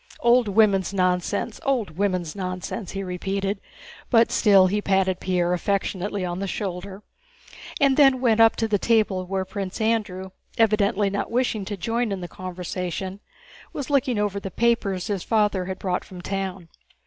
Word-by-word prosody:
Old 240 Hz, 0 st, +4 dB
women's 200 Hz, -2 st, +3 dB
nonsense—old 200 Hz, +5 st, 0 dB
women's 185 Hz, -4 st, -1 dB
nonsense!" 185 Hz, +1 st, -5 dB
he 195 Hz, 0 st, -3 dB
repeated, 195 Hz, +2 st, -3 dB, 0.5 s
but 230 Hz, -2 st, +4 dB
still 195 Hz, -3 st, +5 dB
he 205 Hz, +3 st, 0 dB
patted 190 Hz, -2 st, +1 dB
Pierre 180 Hz, -1 st, 0 dB
affectionately 195 Hz, +1 st, -1 dB
on 175 Hz, 0 st, -3 dB
the 195 Hz, -, -2 dB
shoulder, 195 Hz, +1 st, -5 dB, 0.8 s
and 275 Hz, -3 st, +3 dB
then 270 Hz, -3 st, +6 dB
went 230 Hz, -3 st, +2 dB
up 225 Hz, 0 st, +6 dB
to 225 Hz, -, 0 dB
the 205 Hz, -2 st, +1 dB
table 210 Hz, -5 st, +1 dB
where 190 Hz, 0 st, -2 dB
Prince 195 Hz, 0 st, -5 dB
Andrew, 205 Hz, -4 st, -1 dB, 0.3 s
evidently 210 Hz, -2 st, +2 dB
not 200 Hz, -, -2 dB
wishing 230 Hz, -4 st, 0 dB
to 205 Hz, 0 st, -5 dB
join 230 Hz, +4 st, -1 dB
in 195 Hz, -, -2 dB
the 175 Hz, -, -6 dB
conversation, 185 Hz, +1 st, -5 dB, 0.5 s
was 285 Hz, 0 st, -5 dB
looking 260 Hz, -4 st, +2 dB
over 205 Hz, -1 st, 0 dB
the 195 Hz, -, -6 dB
papers 200 Hz, -4 st, 0 dB
his 205 Hz, -4 st, -2 dB
father 210 Hz, -4 st, +1 dB
had 190 Hz, 0 st, -4 dB
brought 185 Hz, -2 st, -2 dB
from 185 Hz, -, -11 dB
town. 190 Hz, -2 st, -4 dB
195 Hz, 160 wpm, -24 LUFS, 185-220 Hz, 0.8 s, then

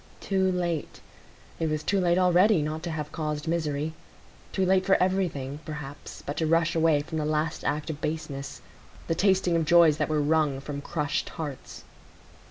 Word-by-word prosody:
Too 190 Hz, -1 st, +1 dB
late! 175 Hz, -4 st, -2 dB, 0.6 s
it 165 Hz, -1 st, 0 dB
was 155 Hz, 0 st, -2 dB
too 200 Hz, -, +1 dB
late 175 Hz, -1 st, +2 dB
already 180 Hz, 0 st, +4 dB
not 155 Hz, +1 st, -3 dB
to 170 Hz, -, -4 dB
have 155 Hz, -2 st, -4 dB
caused 150 Hz, 0 st, -3 dB
misery; 155 Hz, -2 st, -1 dB, 0.6 s
too 190 Hz, -, +1 dB
late 190 Hz, 0 st, +3 dB
for 195 Hz, 0 st, +4 dB
everything, 170 Hz, -7 st, 0 dB
perhaps, 150 Hz, -2 st, -8 dB
but 145 Hz, -, -4 dB
to 160 Hz, -, +1 dB
rush 165 Hz, +1 st, +2 dB
away 160 Hz, -2 st, +3 dB
from 160 Hz, +1 st, -4 dB
the -, -, -1 dB
last 155 Hz, +1 st, -1 dB
act 150 Hz, +2 st, -1 dB
of 150 Hz, 0 st, -9 dB
baseness,—the 140 Hz, -, -6 dB
tasting 190 Hz, -1 st, +2 dB
of 165 Hz, -, +2 dB
joys 165 Hz, -2 st, +6 dB
that -, -, -1 dB
were 155 Hz, -1 st, +1 dB
wrung 150 Hz, -2 st, +2 dB
from 140 Hz, +1 st, -6 dB
crushed 150 Hz, -1 st, -2 dB
hearts. 145 Hz, -5 st, -6 dB
160 Hz, 175 wpm, -27 LUFS, 150-175 Hz, 0.6 s, joys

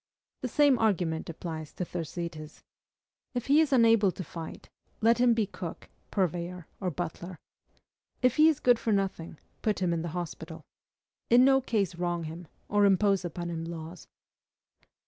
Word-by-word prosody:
The 255 Hz, -, -1 dB
same 280 Hz, -1 st, +4 dB
argument 175 Hz, -8 st, 0 dB
applies 160 Hz, -2 st, -6 dB
to 180 Hz, -, -3 dB
Thersites. 165 Hz, -2 st, -6 dB, 0.7 s
If 245 Hz, -, -2 dB
he 285 Hz, +3 st, +5 dB
is 310 Hz, -, +1 dB
unable 230 Hz, -6 st, +5 dB
to 185 Hz, -, -6 dB
fight, 165 Hz, -2 st, -8 dB, 0.3 s
let 230 Hz, +2 st, +3 dB
him 245 Hz, -1 st, +5 dB
be 225 Hz, -2 st, +2 dB
cook, 180 Hz, -3 st, -8 dB, 0.2 s
purveyor, 180 Hz, -1 st, -2 dB
or 185 Hz, -, -1 dB
butler. 175 Hz, +1 st, -5 dB, 0.9 s
If 250 Hz, +2 st, +3 dB
he 310 Hz, +1 st, +7 dB
is 310 Hz, -, 0 dB
good 245 Hz, -2 st, +4 dB
for 225 Hz, -, -1 dB
nothing, 195 Hz, -5 st, -1 dB, 0.2 s
put 215 Hz, -3 st, 0 dB
him 180 Hz, -2 st, 0 dB
in 165 Hz, -, -1 dB
the 170 Hz, -, -4 dB
hospital. 160 Hz, -2 st, -6 dB, 0.7 s
In 245 Hz, +2 st, +7 dB
no 270 Hz, 0 st, +5 dB
case 210 Hz, -8 st, 0 dB
wrong 175 Hz, 0 st, -2 dB
him, 165 Hz, +2 st, -7 dB, 0.2 s
or 205 Hz, 0 st, +3 dB
impose 195 Hz, 0 st, +3 dB
upon 175 Hz, 0 st, -4 dB
him 165 Hz, -1 st, -4 dB
laws. 165 Hz, 0 st, -8 dB
180 Hz, 160 wpm, -29 LUFS, 165-225 Hz, 0.9 s, he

